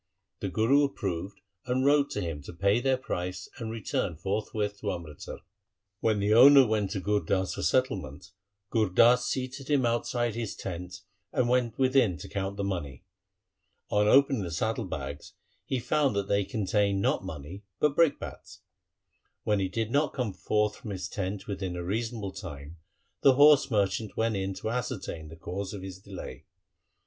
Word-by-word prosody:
The 100 - -3
Guru 120 +9 +3
approved 100 -8 -3 0.3
and 130 +1 +1
wrote 145 0 +4
to - - -3
him 80 -4 -4
to - - -8
pay 100 +6 +2
their 130 +1 +2
price 90 -7 -4
and 115 -2 -4
return 105 -5 -2
forthwith 105 +3 -2
to 105 - -2
Amritsar. 85 -5 -7 0.6
When 110 -1 +1
the 100 +2 +2
owner 135 +3 +9
went 105 -3 0
to 100 - -2
Gur 105 +2 +1
Das 95 +2 -1
for - - -5
settlement, 95 - -1 0.4
Gur 110 -3 +2
Das 120 +6 +5
seated 130 +1 -4
him 140 -4 +3
outside 120 0 0
his 115 -2 -4
tent 90 0 -6 0.3
and 125 - +1
went 120 -2 +1
within 130 -8 +3
to - - -9
count 100 0 -3
the 100 - -2
money. 85 -10 -4 0.9
On 105 0 +3
opening 135 0 +5
the 90 - -4
saddle 110 +7 -1
bags 90 - -6 0.3
he 130 - 0
found 140 -1 +1
that 100 -1 -1
they 100 0 +1
contained 100 -3 0
not 100 - +1
money 80 +2 -7 0.2
but 150 -1 +2
brick 165 -3 +4
bats. 100 -2 -9 0.8
When 105 -1 +1
he 95 -1 0
did 115 +3 -2
not 145 +2 +1
come 125 -7 -2
forth 105 +5 0
from 110 - -9
his 90 -3 -4
tent 95 0 -4
within 95 -3 -4
a 90 - -4
reasonable 110 +1 -3
time, 75 -4 -9 0.4
the 135 -2 +6
horse 145 0 +6
merchant 100 -1 0
went 115 -1 +1
in 95 0 -2
to 105 +3 -3
ascertain 105 -9 -4
the 80 - -10
cause 95 +4 -5
of 95 - -7
his 95 -1 -8
delay. 95 -10 -9
105 Hz, 175 wpm, -28 LUFS, 95-120 Hz, 0.9 s, owner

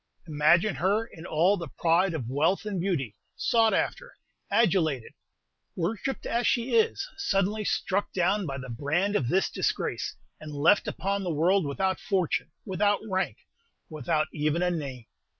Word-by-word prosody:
Imagine 170 +6 +3
her 200 +6 +1
in 170 -6 -11
all 175 +6 +3
the 170 -3 -5
pride 170 +5 +1
of 130 -7 -4
wealth 155 - +1
and 200 -4 -2
beauty, 155 - -1 0.2
sought 225 -1 +3
after, - - -2 0.3
adulated, 160 - +1 0.6
worshipped 215 +9 -2
as 235 +1 0
she 240 +1 +1
is, 455 +2 +2
suddenly 210 - 0
struck 200 0 -1
down 190 +1 +1
by 135 -1 -4
the 130 -1 -7
brand 155 - -1
of 130 - +1
this 190 +9 +2
disgrace, - - -2 0.2
and 155 -1 -8
left 155 +8 +4
upon 200 +1 -2
the 185 - -3
world 170 +2 +2
without 190 +7 -1
fortune, 195 -8 0 0.2
without 205 +1 +1
rank, 190 -1 -1 0.5
without 155 0 0
even 155 +3 0
a 180 - +2
name. 135 -8 -5
180 Hz, 150 wpm, -27 LUFS, 155-205 Hz, 0.6 s, left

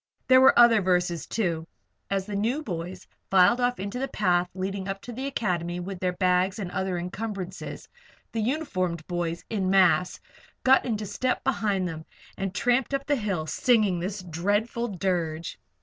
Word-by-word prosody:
There 260 0 +7
were 265 - +6
other 235 -3 +7
verses, 180 -3 0
too, 170 -7 -1 0.4
and 195 - +1
as 190 - -3
the 205 0 -5
new 235 +9 0
boys 180 - -5 0.2
filed 190 +6 +5
off 245 -2 +1
into 200 +6 -4
the 270 - -1
path 180 -5 +1
leading 190 +1 -3
up 195 0 -3
to 245 - -7
the 260 +4 -4
Academy 175 -9 -2
with 185 +1 -6
their 180 0 0
bags 185 +1 +2
and 190 -4 -5
other 190 -1 -2
encumbrances, 190 +1 -5 0.4
the 225 - -2
uniformed 185 - -1
boys, 175 -1 -3
en 195 -4 0
masse, 185 -1 +3 0.4
got 265 +1 +5
into 215 -3 -2
step 250 +6 -1
behind 205 -7 0
them 160 -2 -7 0.3
and 195 0 -4
tramped 245 +3 +1
up 275 0 -3
the 290 - +2
hill, 200 - -2
singing 205 +2 +2
this 190 +2 -4
dreadful 205 +8 -1
dirge. 175 -5 -2
195 Hz, 170 wpm, -26 LUFS, 180-225 Hz, 0.4 s, There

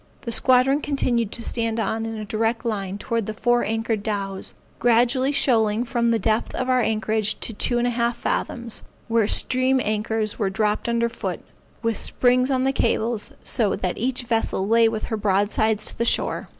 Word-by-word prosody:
The 235 - -5
squadron 260 +4 +3
continued 240 -7 0
to 230 - -4
stand 230 -1 -1
on 225 +1 -1
in 225 - -5
a 215 -1 -5
direct 225 +3 -1
line 200 -4 -2
towards 230 0 -2
the 215 - -4
four 240 +2 +2
anchored 225 -1 -1
dows, 195 -2 -4 0.2
gradually 245 +3 +3
shoaling 230 -6 +2
from 235 -1 0
the 230 - +3
depth 220 +1 0
of 255 - -2
our 255 -1 +3
anchorage 220 -1 0
to 230 - -2
two 240 +4 +1
and 240 - +1
a 245 - +1
half 235 0 0
fathoms, 235 -2 -3 0.3
where 230 -2 +2
stream 255 +3 +3
anchors 215 0 -1
were 200 -3 +1
dropped 210 +3 -1
under 235 0 +1
foot, 235 - -5 0.4
with 230 -1 0
springs 250 +1 +1
on 260 -1 +1
the 270 0 +1
cables, 230 -2 -1
so 215 -5 0
that 185 -2 -3
each 250 +1 -1
vessel 225 -4 -1
lay 230 +1 +5
with 220 -1 -4
her 220 - -2
broadside 210 +2 +1
to 215 - -2
the 235 - -1
shore. 235 - 0
230 Hz, 190 wpm, -23 LUFS, 215-240 Hz, 0.4 s, lay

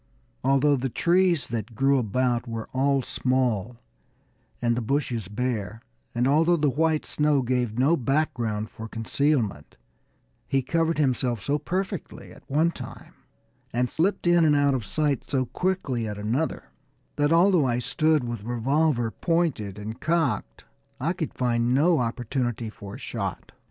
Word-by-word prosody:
Although 135 +2 +3
the 130 +1 -2
trees 175 +4 +2
that 115 0 -4
grew 135 +1 +3
about 120 +1 0
were 115 -1 -5
all 135 0 +2
small 125 -4 0 0.8
and 120 -1 +1
the 125 - -1
bushes 120 -4 -1
bare, 110 -1 -3 0.3
and 120 +2 +2
although 160 +5 +4
the 150 -3 +2
white 155 +3 +1
snow 150 -2 +1
gave 125 -3 -1
no 140 +7 +4
background 120 -6 -1
for 110 - -8
concealment, 115 - -1 0.7
he 135 -1 +1
covered 165 +4 0
himself 130 -5 +1
so 145 +7 -1
perfectly 190 +1 -4
at - - -14
one 155 +5 +2
time, - - -10 0.6
and 125 +1 0
slipped 180 +5 0
in 175 -1 +5
and 150 -2 +4
out 145 -1 +3
of 125 -5 -2
sight 145 +3 -1
so 130 -2 +1
quickly 130 -5 -1
at 105 -1 -5
another, 115 +10 -2 0.5
that 145 +1 +2
although 170 -3 +4
I 120 -1 +1
stood 135 +5 +1
with 120 -3 -4
revolver 120 +2 +1
pointed 155 - -1
and 110 +2 -6
cocked, 155 - -1 0.3
I 160 +7 0
could 170 -4 -4
find 120 0 +1
no 160 +4 +4
opportunity 120 -1 -2
for 100 -2 -9
a - - -8
shot. - - -5
130 Hz, 150 wpm, -26 LUFS, 115-155 Hz, 0.8 s, in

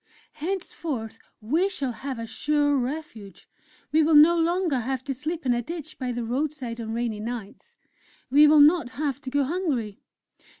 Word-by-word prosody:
Henceforth, 310 - -4 0.2
we 320 - +1
shall 280 -9 -3
have 265 +2 -6
a 230 - -5
sure 290 +4 +1
refuge! 255 -6 -5 0.4
We 315 +1 +4
will 310 0 +3
no 310 +3 +8
longer 340 -3 +1
have 260 +2 -3
to 275 0 -3
sleep 310 +4 -5
in 250 - +3
a 240 - 0
ditch 315 +3 -8
by 255 -2 -2
the 240 0 -3
roadside 250 -1 -3
on 220 -1 -5
rainy 230 -2 -2
nights.... 235 - -7 0.6
We 295 +2 +7
will 300 0 +7
not 310 -2 +5
have 285 -2 -2
to 270 - -6
go 285 +1 +1
hungry! 270 - -2
280 Hz, 170 wpm, -25 LUFS, 240-315 Hz, 0.6 s, no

